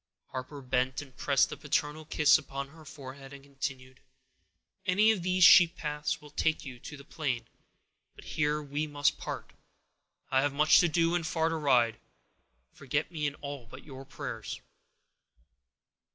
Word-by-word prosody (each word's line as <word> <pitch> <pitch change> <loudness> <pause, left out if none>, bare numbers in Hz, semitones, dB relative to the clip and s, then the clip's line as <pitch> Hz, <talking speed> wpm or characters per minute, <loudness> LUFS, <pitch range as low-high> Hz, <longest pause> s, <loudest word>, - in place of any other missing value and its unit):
Harper 130 +2 -6
bent 130 0 0
and 135 -3 -18
pressed 140 0 +2
a - - -4
paternal 150 +1 -2
kiss 150 +1 +4
upon 140 0 -6
her 160 +2 -15
forehead, 140 -2 -10
and 140 -1 -11
continued: 135 -2 -6 0.8
"Any 205 +4 +4
of 210 -5 -1
these 185 +1 +2
sheep 175 0 +8
paths 150 +1 -2
will 150 -1 -14
take 160 +1 0
you 125 -3 -8
to 150 - -9
the 140 - -12
plain; 130 -8 -3 0.7
but - - -13
here 150 0 -1
we 145 +2 -3
must 145 0 +1
part—I 130 0 -6
have 145 0 0
much 150 +2 +5
to 175 - +4
do 165 +1 +2
and 170 -2 0
far 160 0 +1
to 165 - -2
ride; 125 -7 +2 0.7
forget 145 +4 -2
me 150 -3 -1
in 140 - -4
all 140 -5 -8
but 130 +3 -12
your 135 -2 -9
prayers." 135 0 -6
145 Hz, 160 wpm, -30 LUFS, 135-155 Hz, 0.8 s, sheep